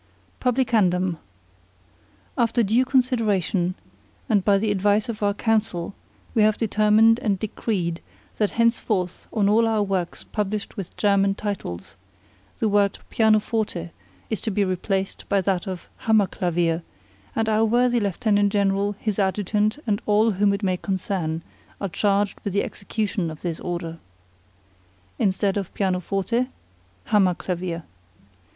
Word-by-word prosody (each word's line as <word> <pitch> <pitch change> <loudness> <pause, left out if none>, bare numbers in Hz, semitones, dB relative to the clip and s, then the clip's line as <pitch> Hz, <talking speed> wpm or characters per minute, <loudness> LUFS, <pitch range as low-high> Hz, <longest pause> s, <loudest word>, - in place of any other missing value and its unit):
PUBLICANDUM, 205 -9 +1 1.2
After 235 0 +2
due 225 +5 +3
consideration, 215 - +1 0.5
and 210 -6 +2
by 200 0 +4
the 210 +1 0
advice 205 +2 +2
of 215 -2 -5
our 205 -1 +1
Council, 210 -6 0 0.4
we 225 - +3
have 215 0 +4
determined 220 +1 +4
and 210 -5 0
decreed 185 -4 -2 0.4
that 210 -2 +2
henceforth 215 -6 0
on 205 -3 +2
all 225 +3 +4
our 220 -2 +2
works 190 -3 -2
published 210 -1 -3
with 195 -4 -7
German 200 -1 +3
titles, 195 - -5 0.6
the 220 - +1
word 205 -1 +2
Pianoforte 215 -5 +1 0.4
is 220 - -1
to 225 - -2
be 205 -1 +1
replaced 190 +1 -2
by 200 - +3
that 185 -1 -1
of 185 -2 -6
Hammer 220 -2 +3
Clavier, 175 -3 0 0.5
and 225 -1 0
our 220 0 +3
worthy 240 +2 +3
Lieutenant 205 0 +1
General, 200 0 +1
his 215 -2 -2
Adjutant, 205 +3 +1
and 210 -3 0
all 215 +2 +4
whom 200 +1 +2
it 200 +1 -2
may 185 -2 +1
concern, 180 -4 -2 0.4
are 200 - -2
charged 200 +2 +1
with 200 - -3
the 200 - +2
execution 200 -3 -3
of 155 -1 -9
this 170 -3 -3
order. 170 -2 -4 1.2
Instead 195 0 +1
of 195 -3 -3
Pianoforte 195 +5 0 0.6
Hammer 195 -4 +3
Clavier. 175 -2 -4
205 Hz, 135 wpm, -24 LUFS, 185-220 Hz, 1.2 s, by